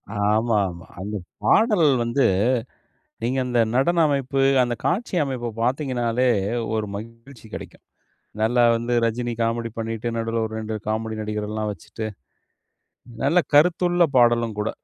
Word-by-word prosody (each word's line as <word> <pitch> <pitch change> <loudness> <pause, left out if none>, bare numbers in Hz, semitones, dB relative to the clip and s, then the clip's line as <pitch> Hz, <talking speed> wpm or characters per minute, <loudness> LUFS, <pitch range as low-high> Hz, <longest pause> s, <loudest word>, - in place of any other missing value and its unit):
ஆமாமா. 105 -4 +1
அந்த 105 +3 -5 0.3
பாடல் 210 -9 +4 0.2
வந்து, 120 +4 +1 1.0
நீங்க 130 +3 0
அந்த 120 -1 0 0.2
நடன 170 +6 +3
அமைப்பு, 135 -1 0 0.2
அந்த 120 0 -1
காட்சி 190 +1 0
அமைப்ப 125 -4 -3
பார்த்தீங்கன்னாலே, 125 -2 0 0.5
ஒரு 110 -1 -1
மகிழ்ச்சி 115 +3 -11
கிடைக்கும். - - -9 0.6
நல்லா 120 +2 +3
வந்து 120 +1 -2
ரஜினி 120 +1 -2
காமெடி 115 0 -1
பண்ணிட்டு, 115 +1 -3
நடுவுல 115 0 -1
ஒரு 110 - -6
2 110 0 -4
காமெடி 110 0 -2
நடிகர் 105 0 -3
எல்லாம் 110 0 -2
வச்சிட்டு 110 +2 -7 1.2
நல்ல 180 - +2 0.2
கருத்துள்ள 175 +2 +4
பாடலும் 120 -3 +3
கூட. 105 - -1
115 Hz, 125 wpm, -23 LUFS, 110-130 Hz, 1.2 s, பாடல்